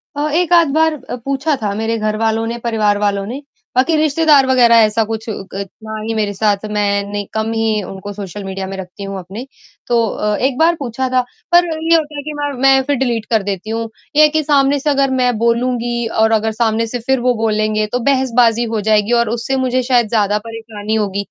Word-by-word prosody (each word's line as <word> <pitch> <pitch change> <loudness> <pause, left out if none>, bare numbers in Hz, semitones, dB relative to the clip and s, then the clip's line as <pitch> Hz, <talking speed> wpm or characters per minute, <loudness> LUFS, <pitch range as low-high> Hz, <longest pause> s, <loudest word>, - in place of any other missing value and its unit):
अ, 295 +1 -1
एक 350 0 +2
आध 335 -2 +6
बार 320 0 +3 0.2
अ, - - -3
पूछा 275 +2 0
था 205 -1 -1
मेरे 225 +1 -1
घर 215 0 -1
वालों 225 0 0
ने, 235 +1 -3
परिवार 215 -3 +1
वालों 200 -1 0
ने। 255 +6 -6 0.3
बाकी 290 +6 +3
रिश्तेदार 305 -2 +4
वगैरह 245 -3 +5
ऐसा 215 +1 +1
कुछ 220 0 -4
क 195 -1 -6 0.2
ना 220 0 -7
हीं 225 +1 -3
मेरे 205 -2 -1
साथ 205 0 0
मैं 200 -1 +1
नहीं 205 -1 -3
कम 220 +1 -1
ही 220 -2 0
उनको 195 +1 -8
सोशल 200 0 -7
मीडिया 190 0 -5
में 195 - -6
रखती 190 +1 -8
हूँ 195 0 -5
अपने। 195 +8 -8 0.4
तो 240 -1 +2
अ, 210 +1 -1
एक 260 0 0
बार 335 +2 +3
पूछा 260 0 -3
था, 255 0 +2 0.3
पर 350 0 +6
ये 325 0 +1
होता 305 -2 -1
है 285 - -4
कि 305 - -5
मैं 290 0 -1
मैं 270 0 +5
फिर 285 - +2
डिलीट 230 -3 -1
कर 220 -3 +2
देती 200 +1 -4
हूँ, 225 0 -3 0.3
ये 305 - +6
है 305 - +6
कि 310 - +2
सामने 280 -1 +2
से 295 - -1
अगर 275 -1 +2
मैं 245 -3 +1
बोलूँगी 240 0 0 0.2
और 220 - +3
अगर 220 +1 -2
सामने 230 0 +1
से 245 +2 -4
फिर 265 -1 +2
वो 250 +1 +2
बोलेंगे 215 -1 0
तो 245 - 0
बहसबाजी 245 -3 +2
हो 210 - -1
जाएगी 210 +1 +3
और 220 - -5
उससे 235 +3 -2
मुझे 255 0 +1
शायद 245 -3 +2
ज़्यादा 210 -2 +1
परेशानी 220 -1 -5
होगी। 200 -2 -1
230 Hz, 220 wpm, -17 LUFS, 210-265 Hz, 0.4 s, आध